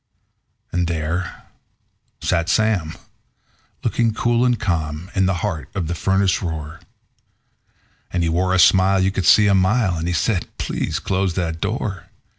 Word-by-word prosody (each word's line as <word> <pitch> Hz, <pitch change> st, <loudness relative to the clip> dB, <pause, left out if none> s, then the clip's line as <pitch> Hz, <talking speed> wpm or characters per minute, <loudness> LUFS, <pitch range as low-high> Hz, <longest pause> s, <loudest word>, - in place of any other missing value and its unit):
And 90 Hz, 0 st, 0 dB
there 85 Hz, +2 st, -3 dB, 0.8 s
sat 85 Hz, -1 st, 0 dB
Sam, 95 Hz, -7 st, +1 dB, 0.9 s
looking 115 Hz, -2 st, +1 dB
cool 120 Hz, +1 st, +1 dB
and 125 Hz, -2 st, +1 dB
calm, 85 Hz, -2 st, -2 dB
in 95 Hz, -2 st, +2 dB
the 95 Hz, -, +1 dB
heart 85 Hz, -8 st, -4 dB
of 95 Hz, -4 st, -1 dB
the 85 Hz, -, -2 dB
furnace 95 Hz, +2 st, +1 dB
roar; 80 Hz, -4 st, -5 dB, 1.3 s
And 90 Hz, -2 st, 0 dB
he 85 Hz, -, +1 dB
wore 90 Hz, +3 st, +1 dB
a -, -, +3 dB
smile 95 Hz, +1 st, +5 dB
you 95 Hz, +1 st, +2 dB
could 95 Hz, -4 st, -1 dB
see 105 Hz, -, +7 dB
a 100 Hz, -, +4 dB
mile, 95 Hz, 0 st, +2 dB
and 80 Hz, +1 st, -3 dB
he 90 Hz, -, -1 dB
said: 100 Hz, -3 st, 0 dB
"Please -, -, -2 dB
close 95 Hz, -2 st, -1 dB
that 80 Hz, -3 st, -2 dB
door. 100 Hz, -2 st, -3 dB
95 Hz, 155 wpm, -21 LUFS, 85-100 Hz, 1.3 s, see